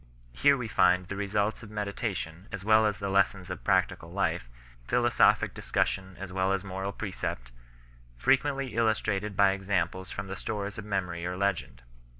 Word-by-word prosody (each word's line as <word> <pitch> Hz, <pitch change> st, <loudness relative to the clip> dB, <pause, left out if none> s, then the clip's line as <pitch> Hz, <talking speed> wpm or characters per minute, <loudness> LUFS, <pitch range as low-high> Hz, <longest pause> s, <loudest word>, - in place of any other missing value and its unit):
Here 140 Hz, -, +4 dB
we 125 Hz, -3 st, -3 dB
find 90 Hz, -3 st, +3 dB
the 100 Hz, -, -5 dB
results 100 Hz, +1 st, -1 dB
of 115 Hz, -, -10 dB
meditation 100 Hz, -4 st, -4 dB
as 100 Hz, -1 st, -6 dB
well 110 Hz, 0 st, +5 dB
as 105 Hz, -1 st, -1 dB
the 100 Hz, -, -3 dB
lessons 95 Hz, -1 st, +1 dB
of 90 Hz, -, -6 dB
practical -, -, +1 dB
life, -, -, -1 dB, 0.3 s
philosophic 120 Hz, -, +3 dB
discussion 95 Hz, -1 st, -1 dB
as 95 Hz, -1 st, -7 dB
well 95 Hz, 0 st, +1 dB
as 95 Hz, -1 st, -1 dB
moral 95 Hz, 0 st, -4 dB
precept, 90 Hz, -, -5 dB, 0.7 s
frequently 135 Hz, -, +1 dB
illustrated 105 Hz, -3 st, 0 dB
by 100 Hz, -1 st, +6 dB
examples 95 Hz, -1 st, -1 dB
from 100 Hz, -, -5 dB
the 95 Hz, 0 st, -5 dB
stores 105 Hz, 0 st, -4 dB
of 105 Hz, -, -7 dB
memory 90 Hz, -4 st, -2 dB
or 90 Hz, +1 st, -3 dB
legend. 75 Hz, -11 st, -1 dB
100 Hz, 160 wpm, -29 LUFS, 95-105 Hz, 0.7 s, by